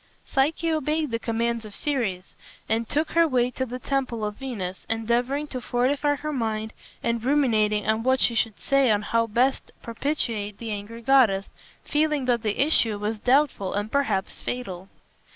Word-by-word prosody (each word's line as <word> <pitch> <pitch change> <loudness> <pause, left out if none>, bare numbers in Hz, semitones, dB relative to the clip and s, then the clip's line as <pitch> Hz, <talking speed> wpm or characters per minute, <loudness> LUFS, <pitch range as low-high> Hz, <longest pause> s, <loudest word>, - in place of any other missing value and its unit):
Psyche 315 +4 +1
obeyed 310 -1 0
the 230 - -1
commands 230 0 -1
of 210 -2 -9
Ceres 220 -11 -2 0.3
and 225 +1 0
took 305 +2 0
her 335 0 +4
way 250 -3 +1
to 260 +1 -3
the 250 +1 -5
temple 255 -4 -2
of 210 - -3
Venus, 200 -9 -5
endeavoring 240 +6 0
to 255 - -5
fortify 280 +5 +1
her 305 +2 -4
mind 220 -3 -2 0.3
and 235 -1 0
ruminating 220 -7 +2
on 220 +1 +1
what 260 +2 +2
she 240 - +3
should 225 -2 0
say 275 -2 +3
and 210 -1 +2
how 230 +2 +1
best 245 +5 +1
propitiate 230 -5 -2
the 230 -2 -5
angry 210 +3 -6
goddess, 230 -7 +4 0.3
feeling 300 -2 +1
that 240 -2 +2
the 215 -2 -2
issue 230 -8 +3
was 210 +1 -3
doubtful 250 -6 +2
and 205 +2 -2
perhaps 220 -9 0
fatal. 195 -7 -5
235 Hz, 170 wpm, -25 LUFS, 215-275 Hz, 0.3 s, her